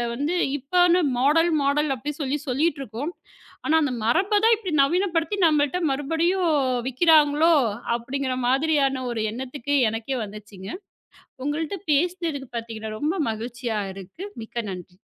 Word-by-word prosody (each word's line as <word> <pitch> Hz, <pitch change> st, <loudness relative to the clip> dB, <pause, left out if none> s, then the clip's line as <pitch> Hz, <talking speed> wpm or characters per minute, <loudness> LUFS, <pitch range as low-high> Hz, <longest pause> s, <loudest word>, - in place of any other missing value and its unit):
வந்து 290 Hz, +8 st, -1 dB, 0.2 s
இப்போ 355 Hz, +7 st, +1 dB, 0.4 s
model 325 Hz, +5 st, +3 dB
model 285 Hz, +1 st, +1 dB
அப்படி 295 Hz, +6 st, -4 dB
சொல்லி 285 Hz, +2 st, -1 dB
சொல்லிக்கிட்டிருக்கோம். 275 Hz, 0 st, -1 dB, 0.5 s
ஆனால் 320 Hz, 0 st, +4 dB
அந்த 285 Hz, -, 0 dB
மரபை 380 Hz, -, +2 dB
தான் 460 Hz, -, +6 dB
இப்படி 400 Hz, -6 st, -6 dB
நவீனப்படுத்தி 345 Hz, +4 st, +1 dB
நம்மிடம் 310 Hz, +2 st, +2 dB
மறுபடியும் 320 Hz, +6 st, 0 dB, 0.6 s
விற்கிறார்களோ 310 Hz, +2 st, +4 dB, 0.4 s
அப்படிங்கிற 260 Hz, +2 st, -3 dB
மாதிரியான 275 Hz, -1 st, +2 dB
ஒரு 225 Hz, -2 st, -2 dB
எண்ணத்துக்கு 265 Hz, +3 st, -3 dB
எனக்கே 225 Hz, +4 st, -3 dB
வந்துருச்சுங்க. 205 Hz, -2 st, -9 dB, 0.8 s
உங்களிடம் 320 Hz, +6 st, -3 dB
பேசினது 325 Hz, -3 st, 0 dB
பார்த்தீங்கன்னா 220 Hz, -2 st, -5 dB
ரொம்ப 320 Hz, +6 st, -1 dB
மகிழ்ச்சியாக 225 Hz, -3 st, -4 dB
இருக்கு. 195 Hz, -, -9 dB, 0.2 s
மிக்க 230 Hz, +1 st, -5 dB
நன்றி! 180 Hz, -1 st, -9 dB
285 Hz, 120 wpm, -24 LUFS, 235-325 Hz, 0.8 s, தான்